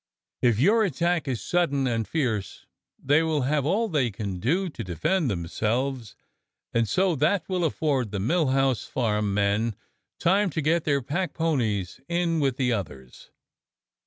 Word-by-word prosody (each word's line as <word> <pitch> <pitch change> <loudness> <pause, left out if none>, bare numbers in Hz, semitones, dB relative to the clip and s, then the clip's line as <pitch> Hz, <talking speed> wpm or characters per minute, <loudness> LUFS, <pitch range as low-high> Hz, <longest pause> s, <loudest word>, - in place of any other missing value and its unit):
If 120 -4 +3
your 215 - +4
attack 170 -2 0
is 125 -4 -2
sudden 155 -6 +1
and 115 -3 -1
fierce 120 -11 -2 0.3
they 145 +4 +3
will 160 -3 0
have 145 +1 0
all 215 +7 +1
they 145 - +1
can 100 -3 -5
do 175 - +1
to 165 - -6
de 90 -2 -6
fend 160 - +1
themselves, 115 +7 -2 0.6
and 115 -2 +1
so 185 - +2
that 160 +8 +1
will 185 -2 -1
afford 145 -7 0
the 100 -1 -3
Mill 155 - +1
House 135 -2 +1
Farm 105 -4 -1
men 100 +2 +1 0.4
time 195 +3 +3
to 160 - -3
get 165 +2 +1
their 140 -3 +1
packponies 140 - -1
in 170 -1 +1
with 135 -3 0
the 125 -2 +1
others. 70 - -7
135 Hz, 160 wpm, -26 LUFS, 110-165 Hz, 0.6 s, your